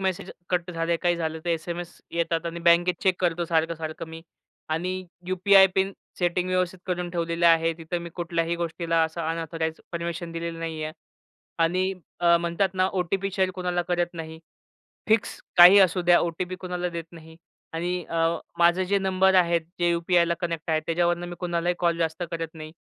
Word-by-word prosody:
Message 190 -1 -2 0.2
cut 180 0 0
झाले, 165 0 0
काही 175 0 +1
झालं, 160 -1 -3
तर - - -3
एस-एम-एस 170 +1 -4
येतात 170 0 -1
आणि 170 0 -5
बँकेत 175 +1 +5
चेक 185 -2 +2
करतो 175 -1 +1
सारखं-सारखं 165 -1 -2
मी. 160 0 -9 0.5
आणि 170 +4 -1 0.3
यु-पी-आय 190 +1 +6
पिन 195 +1 +1 0.3
सेटिंग 180 0 0
व्यवस्थित 185 0 0
करून 180 -1 -2
ठेवलेली 170 0 -1
आहे, 165 0 +5
तिथं 165 +2 -3
मी 170 - -7
कुठल्याही 170 -1 -1
गोष्टीला 165 -1 0
असं 160 +1 -5
अनअथॉराइज्ड 165 0 -3
परमिशन 170 0 -4
दिलेलं 165 0 -4
नाही 165 -1 -4
आहे 155 - -5 0.7
आणि 185 +3 +1 0.3
अ, 170 -1 +5
म्हणतात 170 +3 0
ना 185 0 +2
ओ-टी-पी 195 +2 -1
शेअर 190 -2 +1
कुणाला 180 -1 -1
करत 175 0 0
नाही. 160 -1 -7 0.7
फिक्स 220 -1 +2 0.2
काही 180 +3 +10
असू 185 -1 +4
द्या 175 0 +5
ओ-टी-पी 175 +2 -3
कोणाला 180 -1 -4
देत 170 -1 -5
नाही 160 -1 -13 0.4
आणि 175 +2 -2
अ, 165 - -4 0.4
माझे 175 +2 +4
जे 200 +2 +2
नंबर 190 0 +3
आहेत 170 -2 +4 0.2
जे 175 0 +3
यु-पी-आयला 170 0 +2
कनेक्ट 165 -2 -3
आहेत 155 0 +2
त्याच्यावरनं 175 +1 0
मी 175 - -7
कुणालाही 175 0 -1
कॉल 170 -1 +1
जास्त 165 +1 -1
करत 165 -1 -4
नाही. 155 -1 -9
170 Hz, 175 wpm, -25 LUFS, 165-180 Hz, 0.7 s, काही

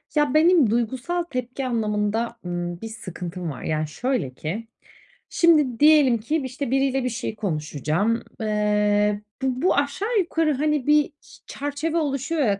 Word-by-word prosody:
Ya, 295 -3 +2
benim 315 - +5
duygusal 255 +10 -1
tepki 255 -3 -4
anlamında, 225 0 -1
ımm, 175 0 -4
bir 225 - -5
sıkıntım 180 -5 -6
var. 135 - -8
Yani, 155 0 -1
şöyle 245 - -2
ki, 190 - -5 0.6
şimdi, 300 -8 +3
diyelim 295 -5 +6
ki, 235 +9 -1
işte, 260 0 -4
biriyle 270 0 +1
bir 250 - 0
şey 235 -1 -4
konuşacağım. 170 - -1 0.2
Eee, 210 -1 +1 0.2
bu 260 -1 -1
bu 370 - +4
aşağı 390 +11 0
yukarı, 325 -4 +1
hani, 295 -1 0
bir 300 +1 +4 0.4
çerçeve 290 +3 -3
oluşuyor 290 +1 -1
ya 205 -7 +2
245 Hz, 145 wpm, -24 LUFS, 210-290 Hz, 0.6 s, diyelim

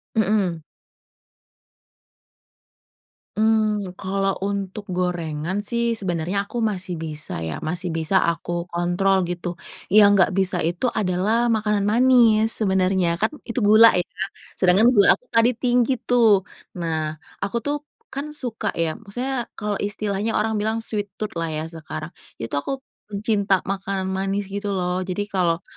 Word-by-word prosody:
Mhm. 195 -6 +1 2.8
Hmm, 215 -3 +1
kalau 195 0 0
untuk 200 0 -4
gorengan 175 0 -2
sih 235 +2 0
sebenarnya 190 -1 -2
aku - - -5
masih 185 -4 -2
bisa 155 -1 -5
ya, 80 - -5
masih 175 +3 -2
bisa 160 +4 0
aku 170 +1 -2
kontrol 175 +3 +2
gitu, 175 0 -3 0.4
yang 205 -1 +7
gak 185 -1 +3
bisa 190 -1 +1
itu 175 +9 0
adalah 210 +3 +1
makanan 210 -2 +1
manis 225 -1 +5
sebenarnya 190 -3 +2
kan 220 - +3 0.2
itu 235 +1 -3
gula 215 +2 +7
ya. 180 -1 +1 0.5
Sedangkan 190 +5 +5
gula 205 -6 +6
aku 250 - -28
tadi 230 +2 +4
tinggi 245 +1 +2
tuh. 225 -5 +4 0.4
Nah, 160 -2 -2 0.3
aku 200 +4 -1
tuh 290 0 0 0.3
kan 275 +2 -4
suka 245 -6 -3
ya 165 +1 -1
maksudnya 245 +4 -3
kalau 210 -2 -3
istilahnya 205 +1 -2
orang 220 0 0
bilang 220 +2 -1
sweet 205 -3 -2
tooth 215 -4 -5
lah 165 - -1
ya 155 +1 -4
sekarang 155 -1 -7 0.3
itu 115 - -4
aku 270 - -3 0.2
pencinta 200 -2 +1
makanan 195 -1 -2
manis 195 +1 -2
gitu 200 0 -3
loh 180 0 -1
jadi 205 +3 -3
kalau 175 -3 +1
200 Hz, 135 wpm, -23 LUFS, 180-220 Hz, 2.8 s, yang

